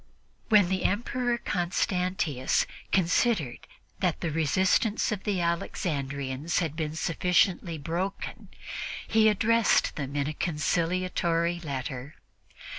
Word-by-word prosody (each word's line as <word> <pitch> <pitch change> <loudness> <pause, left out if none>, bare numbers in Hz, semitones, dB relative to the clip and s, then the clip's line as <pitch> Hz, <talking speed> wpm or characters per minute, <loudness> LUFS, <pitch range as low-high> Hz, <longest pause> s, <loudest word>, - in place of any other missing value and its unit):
When 210 -5 +6
the 190 -1 0
Emperor 240 +3 0
Constantius 180 - 0 0.3
considered 180 - +1 0.3
that - - 0
the 165 - -2
resistance 185 +9 +2
of 205 -3 -4
the 195 -4 0
Alexandrians 140 -4 -2
had 160 -4 0
been 155 -1 -3
sufficiently 175 +1 +1
broken, 170 +6 -4 0.6
he 220 -1 +5
addressed 225 +1 +3
them 140 -1 -4
in 140 -1 +1
a 155 - -2
conciliatory 170 +1 0
letter. 135 -2 -5
170 Hz, 105 wpm, -28 LUFS, 150-190 Hz, 0.6 s, When